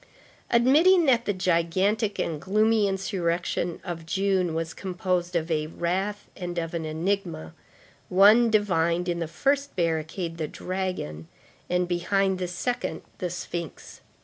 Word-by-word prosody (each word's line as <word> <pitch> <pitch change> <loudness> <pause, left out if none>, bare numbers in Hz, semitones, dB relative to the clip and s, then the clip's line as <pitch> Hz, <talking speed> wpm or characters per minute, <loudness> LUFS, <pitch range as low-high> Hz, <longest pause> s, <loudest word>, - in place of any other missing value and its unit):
Admitting 310 +10 +5
that 245 -4 +3
the - - +1
gigantic 185 +4 +1
and 155 -3 -2
gloomy 215 +2 +3
insurrection 180 -3 -1
of 170 -3 -5
June 185 -1 0
was 165 0 -3
composed 180 -1 -2
of 165 0 -1
a 155 -1 0
wrath 190 +5 -2
and 175 -1 -5
of 165 0 -2
an 165 -2 -3
enigma, 165 - -2 0.6
one 210 +6 +6
divined 180 -5 +1
in 170 -1 -1
the 165 - -2
first 280 - 0
barricade 165 0 -2
the 155 - -1
dragon, 180 - -4 0.4
and 180 0 +1
behind 190 +2 +1
the 180 - -2
second 180 -2 -3 0.2
the 180 - -2
sphinx. 170 -2 -6
180 Hz, 135 wpm, -26 LUFS, 170-200 Hz, 0.6 s, one